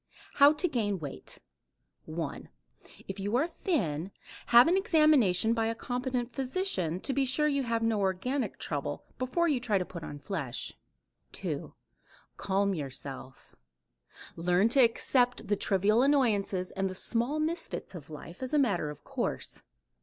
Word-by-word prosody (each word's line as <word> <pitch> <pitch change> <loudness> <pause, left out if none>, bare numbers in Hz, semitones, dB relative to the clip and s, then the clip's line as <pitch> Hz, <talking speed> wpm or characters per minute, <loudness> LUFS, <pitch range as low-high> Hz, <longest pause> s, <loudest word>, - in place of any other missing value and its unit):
HOW 285 +1 +8
TO 310 +4 +1
GAIN 220 - -1
WEIGHT 145 -5 -7 0.7
1. 160 -1 -5 0.6
If 195 +1 -6
you 205 +4 -1
are 270 +6 +3
thin, 190 - -1 0.4
have 240 +4 +8
an 345 - +4
examination 305 - +4
by 225 -1 +1
a 230 - -1
competent 250 0 -3
physician 255 - -1
to 275 - 0
be 275 - +2
sure 265 +4 +2
you 280 -2 +1
have 230 -2 -1
no 225 -2 +1
organic 200 +8 -1
trouble, - - -4 0.2
before 300 +7 +1
you 285 -6 +2
try 230 -5 +1
to 180 - -1
put 170 -2 -8
on 145 - -7
flesh. 145 - -4 0.6
2. - - -5 0.6
Calm 200 0 0
yourself. 135 -4 -7 0.8
"Learn 180 +5 +2
to 270 - +2
accept 245 +1 +2
the 205 - +3
trivial 200 +3 +2
annoyances 215 -9 +2
and 195 0 -1
the 185 - -6
small 240 +9 -1
misfits 320 - -3
of 160 -5 -9
life 160 - -10
as 260 +3 -2
a - - +5
matter 200 - +1
of 150 - -10
course. - - -3
225 Hz, 155 wpm, -30 LUFS, 185-270 Hz, 0.8 s, HOW